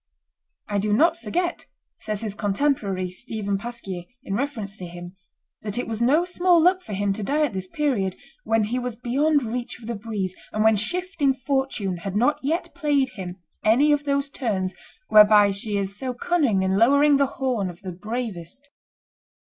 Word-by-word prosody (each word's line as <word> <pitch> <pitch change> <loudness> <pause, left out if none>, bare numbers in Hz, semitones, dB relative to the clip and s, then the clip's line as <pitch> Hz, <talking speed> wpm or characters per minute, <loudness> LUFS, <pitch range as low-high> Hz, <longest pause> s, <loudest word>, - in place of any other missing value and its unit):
"I 205 -1 0
do 210 +1 0
not 325 +9 +4
forget," 350 +1 -2 0.3
says 215 -2 -4
his 215 -3 -3
contemporary 205 -3 0
Stephen 200 -1 -3
Pasquier 200 -6 -6 0.2
in 195 - -4
reference 220 -5 -3
to 180 - -6
him, 175 +1 -9 0.5
"that 210 +1 -3
it 245 - -2
was 225 0 -3
no 295 +8 +4
small 360 -1 +3
luck 365 +3 +4
for 215 - -8
him 200 0 0
to 215 - -5
die 295 +8 +2
at 245 - -4
this 190 -1 -4
period, 210 -8 0 0.3
when 225 -1 +2
he 235 +5 -1
was 250 -2 -4
beyond 280 +5 +1
reach 240 +2 -4
of 230 - -12
the 235 - -3
breeze, 205 -4 -4 0.2
and 215 - 0
when 220 0 +5
shifting 300 - 0
Fortune 265 -8 -1
had 190 +3 -5
not 245 +8 +2
yet 320 +6 -2
played 285 -3 +1
him 185 -7 -7 0.3
any 260 +8 +4
of 290 0 +1
those 280 0 0
turns 190 -9 -2 0.4
whereby 210 -1 +7
she 200 +1 -2
is 200 0 -2
so 255 -2 -3
cunning 255 - +1
in 190 +1 +1
lowering 280 +4 +5
the 280 0 +3
horn 245 -8 0
of 175 0 -11
the 185 - -5
bravest." 220 - -6
230 Hz, 180 wpm, -24 LUFS, 200-280 Hz, 0.5 s, whereby